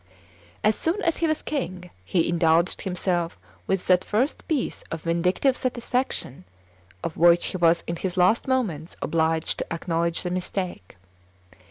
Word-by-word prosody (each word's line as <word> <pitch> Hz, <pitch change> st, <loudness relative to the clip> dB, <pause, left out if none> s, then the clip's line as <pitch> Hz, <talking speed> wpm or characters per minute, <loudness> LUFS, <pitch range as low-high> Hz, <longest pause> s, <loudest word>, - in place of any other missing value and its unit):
As 215 Hz, 0 st, +4 dB
soon 335 Hz, +5 st, 0 dB
as 330 Hz, -, +1 dB
he 330 Hz, -, +1 dB
was 310 Hz, -1 st, -1 dB
king, 185 Hz, -, -4 dB
he 165 Hz, -, +1 dB
indulged 170 Hz, +1 st, +2 dB
himself 180 Hz, -, -1 dB, 0.3 s
with 190 Hz, -1 st, 0 dB
that 185 Hz, -1 st, +4 dB
first 245 Hz, +8 st, -1 dB
piece 295 Hz, -6 st, -1 dB
of 165 Hz, -1 st, -5 dB
vindictive 180 Hz, +10 st, +2 dB
satisfaction 245 Hz, -, -2 dB, 0.6 s
of 160 Hz, -, -4 dB
which 170 Hz, +1 st, +5 dB
he -, -, -3 dB
was 170 Hz, -1 st, +3 dB
in 170 Hz, -, -3 dB
his 185 Hz, +1 st, -3 dB
last 185 Hz, +8 st, +3 dB
moments 195 Hz, -, -1 dB
obliged 160 Hz, 0 st, +1 dB
to -, -, -5 dB
acknowledge 165 Hz, 0 st, -1 dB
the 180 Hz, -, -2 dB
mistake. 180 Hz, -, -4 dB
180 Hz, 150 wpm, -25 LUFS, 165-220 Hz, 0.6 s, which